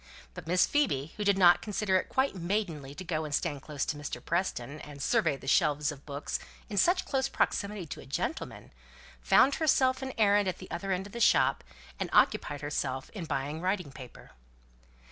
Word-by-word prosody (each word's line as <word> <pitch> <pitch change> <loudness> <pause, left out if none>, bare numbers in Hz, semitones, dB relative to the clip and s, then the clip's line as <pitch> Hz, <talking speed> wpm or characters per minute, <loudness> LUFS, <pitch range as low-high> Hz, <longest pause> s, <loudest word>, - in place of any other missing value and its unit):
But 150 - -9
Miss 180 +2 +4
Phoebe, 165 - 0
who 210 - -2
did 200 -1 +3
not 175 -2 +6
consider 210 -2 -1
it - - -3
quite 265 +1 +1
maidenly 170 -7 -3
to 185 - -7
go 160 -3 -2
and 150 -2 -1
stand 145 -2 -2
close 145 -1 -3
to - - -2
Mr. 145 -1 -5
Preston, 155 -6 -2
and 145 -1 -10
survey 145 +2 +2
the - - -13
shelves 145 +2 +2
of 140 0 -12
books 140 0 -4 0.3
in 205 - -3
such 360 - +3
close 270 0 0
proximity 200 -7 -1
to 150 - -7
a - - -14
gentleman, 175 - -4 0.5
found 270 +2 +5
herself 265 -4 +3
an 265 -1 -4
errand 205 -2 +4
at 185 - -2
the 185 - -11
other 195 -1 -3
end 190 +1 -1
of 200 - -12
the 235 - -5
shop, - - +4 0.4
and - - -2
occupied 145 -1 +3
herself 135 -3 -3
in 195 -6 -6
buying 145 +2 -3
writing 185 -5 -1
paper. 130 -3 -12
175 Hz, 195 wpm, -30 LUFS, 145-205 Hz, 0.5 s, not